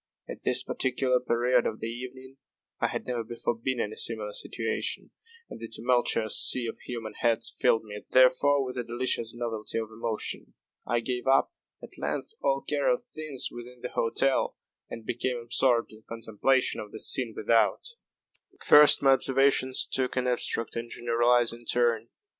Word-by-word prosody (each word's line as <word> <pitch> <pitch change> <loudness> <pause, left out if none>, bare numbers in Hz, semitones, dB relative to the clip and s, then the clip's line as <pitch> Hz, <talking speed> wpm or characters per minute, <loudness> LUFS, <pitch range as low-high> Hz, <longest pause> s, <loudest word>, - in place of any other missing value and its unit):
At - - -8
this - - +1
particular 130 0 0
period 125 0 +1
of 110 - -5
the - - -5
evening 130 +3 -8 0.4
I - - +1
had - - -5
never 120 -2 -3
before 120 +1 -3
been 120 +2 -3
in 105 -1 -2
a - - -10
similar 110 -3 -2
situation, - - -3 0.4
and - - -10
the 115 - -7
tumultuous 115 -1 +1
sea 125 -2 +4
of 115 - -6
human 115 -3 -7
heads 115 -1 0
filled 110 - +2
me, 105 -1 -9
therefore, 130 +2 +4
with 125 0 -6
a - - -2
delicious 120 -1 -1
novelty 115 -3 -4
of 110 -1 -4
emotion. 110 -1 -4 0.3
I 120 -1 0
gave 125 +1 -4
up, 135 0 +3 0.3
at - - -11
length, - - -4
all - - 0
care - - +1
of - - -2
things 155 - -1
within 120 +1 -11
the 125 - -5
hotel, 130 +4 0 0.3
and 115 - -9
became 125 +2 -2
absorbed 120 0 +2
in 110 0 -15
contemplation 115 +3 +1
of 105 - -10
the 110 - -8
scene 115 -1 +4
without. 115 +1 +2 0.7
At - - -14
first 150 -1 +7
my 135 - +6
observations 135 0 +2
took 130 -1 -2
an 130 - 0
abstract 120 -2 -2
and 115 0 -5
generalizing 120 0 +1
turn. 115 -2 +1
120 Hz, 170 wpm, -27 LUFS, 115-130 Hz, 0.7 s, first